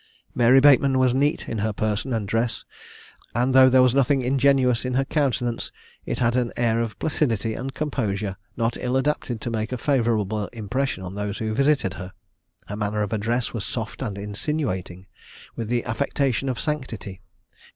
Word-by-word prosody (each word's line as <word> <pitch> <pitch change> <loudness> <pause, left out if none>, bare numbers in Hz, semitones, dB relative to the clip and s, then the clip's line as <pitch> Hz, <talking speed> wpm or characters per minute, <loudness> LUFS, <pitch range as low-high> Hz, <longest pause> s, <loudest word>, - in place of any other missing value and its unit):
Mary 125 +2 +5
Bateman 135 -1 +5
was 130 -1 +3
neat 145 +3 +1
in 115 - -3
her 110 +2 0
person 110 +4 -2
and 110 -4 -1
dress, 115 +2 -1 0.7
and 125 +2 +2
though 130 0 +8
there 130 0 +6
was 125 -1 +4
nothing 140 0 +2
ingenuous 130 -2 +3
in 125 0 -2
her 135 +1 +2
countenance, 125 -5 -1 0.4
it - - -2
had 120 0 +1
an 125 -2 +1
air 115 -1 +2
of 110 -4 -4
placidity 115 -8 0
and 135 +3 -5
composure, 105 -10 -2 0.2
not 115 0 0
ill 125 +1 0
adapted 135 -4 -1
to 120 - -4
make 110 0 -2
a 125 - -2
favourable 110 -6 0
impression 120 -1 -2
on 90 0 -6
those 105 0 -3
who 110 -1 -2
visited 135 -6 +2
her. 95 0 -8 0.5
Her 105 - -6
manner 105 0 -1
of 105 - -3
address 115 +3 -1
was 115 -4 -3
soft 110 +2 -4
and 105 -7 -3
insinuating, 100 - -3 0.5
with 115 - -4
the 120 -1 0
affectation 135 +1 0
of 125 - -2
sanctity. 115 - -4
120 Hz, 175 wpm, -24 LUFS, 110-130 Hz, 0.7 s, though